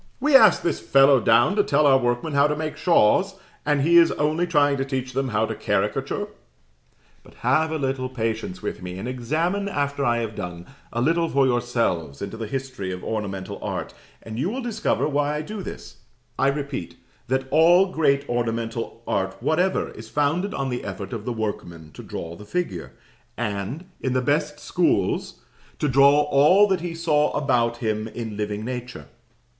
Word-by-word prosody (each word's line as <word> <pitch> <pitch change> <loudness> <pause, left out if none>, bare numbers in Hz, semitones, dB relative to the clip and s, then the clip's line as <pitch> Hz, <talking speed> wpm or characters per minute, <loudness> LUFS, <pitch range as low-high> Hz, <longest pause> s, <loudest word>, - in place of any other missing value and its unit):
"We 295 -1 +3
asked 220 -7 +7
this 170 - 0
fellow 135 0 +5
down 120 - +4
to 205 - +5
tell 150 -2 +2
our 135 -2 +6
workmen 120 +5 -1
how 140 +1 +4
to 150 - -1
make 155 0 -4
shawls, 175 - +3 0.3
and 145 -2 +2
he 170 +3 +5
is 170 -1 +6
only 155 +4 0
trying 145 -4 +3
to 135 - 0
teach 130 -2 -4
them 135 +1 -1
how 110 -1 +1
to - - -4
caricature." 105 0 -1 0.9
But - - -19
have 155 +6 +3
a 160 - -1
little 130 -2 -2
patience 120 - -3
with - - -4
me, 90 0 -6
and 95 - -5
examine, 160 +11 -1
after 140 -4 -1
I 120 -3 +2
have 110 -1 -4
done, 90 -2 -6 0.3
a 120 - -2
little 165 +3 +2
for 140 0 +3
yourselves 115 - -1
into 100 - -5
the 110 -1 -5
history 130 -6 -4
of 90 0 -6
ornamental 100 -4 -4
art, - - -4 0.3
and 110 +1 -7
you 160 +8 0
will 255 +4 -4
discover 220 -9 0
why 145 0 0
I 150 - -3
do 210 +5 -6
this. - - -9 0.4
You - - +3
will - - +5
discover, - - +5
I 140 - -1
repeat, 140 -11 -6 0.3
that 130 +1 -1
all 175 +5 +5
great 140 -3 +1
ornamental 115 -1 -3
art 95 -1 -1
whatever 180 +4 0
is 110 +1 -11
founded 160 - 0
on 135 -1 -2
the 125 -1 -3
effort 100 0 -6
of 110 -2 -5
the 125 - -2
workman 85 -8 -5
to - - -11
draw 85 0 -7
the 105 - -11
figure, 105 - -4 0.4
and, 115 - -3
in 130 - -1
the 130 - +1
best 150 +2 0
schools, 180 +2 0 0.4
to 150 - 0
draw 140 +2 +5
all 150 +8 +5
that 190 -3 +1
he 170 -1 -4
saw 155 -3 +2
about 120 -5 +1
him 110 -2 -2
in 115 -1 -6
living 105 0 -3
nature. 125 0 -6
135 Hz, 190 wpm, -23 LUFS, 115-155 Hz, 0.9 s, asked